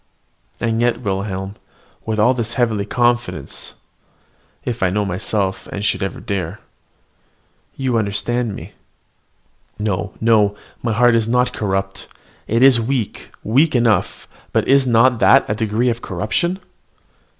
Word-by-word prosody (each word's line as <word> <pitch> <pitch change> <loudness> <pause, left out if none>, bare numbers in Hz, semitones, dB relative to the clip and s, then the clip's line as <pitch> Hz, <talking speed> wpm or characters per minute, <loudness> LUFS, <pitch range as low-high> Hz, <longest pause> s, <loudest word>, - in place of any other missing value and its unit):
And 115 0 0
yet, 120 0 +1
Wilhelm, 95 -1 -3 0.5
with 110 -1 -1
all 110 +4 +4
this 120 -1 -3
heavenly 110 -5 +1
confidence, 120 +1 -1 0.9
if 120 -1 -3
I 95 - +3
know 105 +2 0
myself, 95 0 -2
and 100 +1 -4
should - - 0
ever 95 - -3
dare 95 -1 -4 1.2
you 130 -4 0
understand 110 +2 -1
me. - - -9 1.1
No, 105 -1 -2
no! 110 -3 +3 0.3
my 120 - -1
heart 120 +2 +4
is 115 -1 +2
not 125 +1 +2
so - - -18
corrupt, 95 -2 -3 0.4
it 115 +3 +2
is 130 -3 +6
weak, 120 -2 -3
weak 135 +7 +3
enough 115 -3 +1 0.2
but - - +1
is 135 -1 +4
not 120 +1 +4
that 135 +3 +5
a - - 0
degree 110 +3 0
of 120 0 -2
corruption? 110 - -1
115 Hz, 140 wpm, -19 LUFS, 100-120 Hz, 1.2 s, is